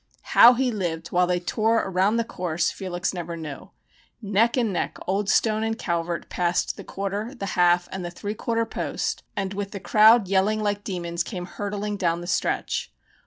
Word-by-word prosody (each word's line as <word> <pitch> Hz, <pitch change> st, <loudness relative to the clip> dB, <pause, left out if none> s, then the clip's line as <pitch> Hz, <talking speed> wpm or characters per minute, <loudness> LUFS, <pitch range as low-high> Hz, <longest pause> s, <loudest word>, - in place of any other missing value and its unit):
How 245 Hz, +1 st, +9 dB
he 255 Hz, 0 st, +1 dB
lived 170 Hz, -6 st, -3 dB
while 180 Hz, 0 st, +2 dB
they 180 Hz, 0 st, +1 dB
tore 220 Hz, +5 st, +1 dB
around 190 Hz, +3 st, +1 dB
the 230 Hz, -, +2 dB
course 175 Hz, -6 st, -1 dB
Felix 185 Hz, -1 st, -3 dB
never 170 Hz, -2 st, -5 dB
knew. 155 Hz, -4 st, -8 dB, 0.5 s
Neck 220 Hz, +3 st, +2 dB
and 230 Hz, -5 st, +1 dB
neck 175 Hz, -, -2 dB
Old 195 Hz, +2 st, -1 dB
Stone 215 Hz, -1 st, +2 dB
and 225 Hz, 0 st, -1 dB
Calvert 170 Hz, -1 st, -2 dB
passed 175 Hz, 0 st, 0 dB
the -, -, -9 dB
quarter, 200 Hz, +6 st, -4 dB
the 200 Hz, -, -5 dB
half, 175 Hz, 0 st, +3 dB
and 190 Hz, -1 st, -5 dB
the 175 Hz, -, -4 dB
three 205 Hz, +4 st, -5 dB
quarter 230 Hz, +1 st, -1 dB
post, -, -, -3 dB, 0.2 s
and 195 Hz, -1 st, -2 dB
with 200 Hz, 0 st, -4 dB
the 200 Hz, -, -5 dB
crowd 215 Hz, +2 st, +5 dB
yelling 200 Hz, +3 st, +2 dB
like 205 Hz, 0 st, -1 dB
demons 170 Hz, -3 st, -3 dB
came 180 Hz, -3 st, -6 dB
hurtling 205 Hz, +2 st, -4 dB
down 170 Hz, -3 st, 0 dB
the -, -, -7 dB
stretch. 175 Hz, -, -1 dB
195 Hz, 185 wpm, -24 LUFS, 175-215 Hz, 0.5 s, How